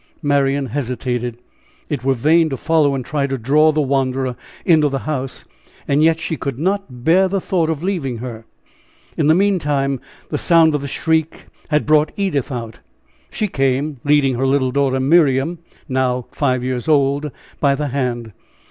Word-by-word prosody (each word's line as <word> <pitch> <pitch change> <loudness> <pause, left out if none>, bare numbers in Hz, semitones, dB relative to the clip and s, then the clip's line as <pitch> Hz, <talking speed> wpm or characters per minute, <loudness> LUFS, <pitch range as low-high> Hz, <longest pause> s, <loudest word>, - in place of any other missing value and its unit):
Marian 140 -1 +1
hesitated. 125 -2 -3 0.5
It 140 -5 -3
were 135 0 +2
vain 160 +6 +3
to 135 - -3
follow 155 -3 +2
and 130 -2 -4
try 145 -2 -1
to 135 -1 -2
draw 150 +6 +3
the 155 0 0
wanderer 130 -2 -1 0.3
into 155 -4 +4
the 135 - -2
house; 135 -4 -4 0.4
yet 160 +3 +3
she 165 -1 -3
could 140 -3 -4
not 180 -7 -2
bear 185 +6 +4
the 195 +1 -1
thought 175 -3 0
of 160 0 -3
leaving 165 -11 -2
her. 115 -2 -7 0.7
In 150 - +1
the 155 - +5
meantime 145 -9 +1 0.3
the - - -2
sound 165 -2 +4
of 150 - -1
the 140 - -5
shriek 160 +2 -1 0.2
had 150 -1 +1
brought 155 0 +3
Edith 160 -9 -1
out. 115 -3 -6 0.5
She 215 - -2
came, 135 -2 -1
leading 145 -2 +3
her 135 - +1
little 135 -1 +1
daughter 135 -1 +1
Miriam, 145 +2 +2 0.3
now 130 -2 0
five 130 -4 0
years 130 +2 -3
old, 145 0 +2 0.3
by 140 -1 +3
the 150 0 -3
hand. 120 -4 -2
140 Hz, 165 wpm, -19 LUFS, 130-155 Hz, 0.7 s, the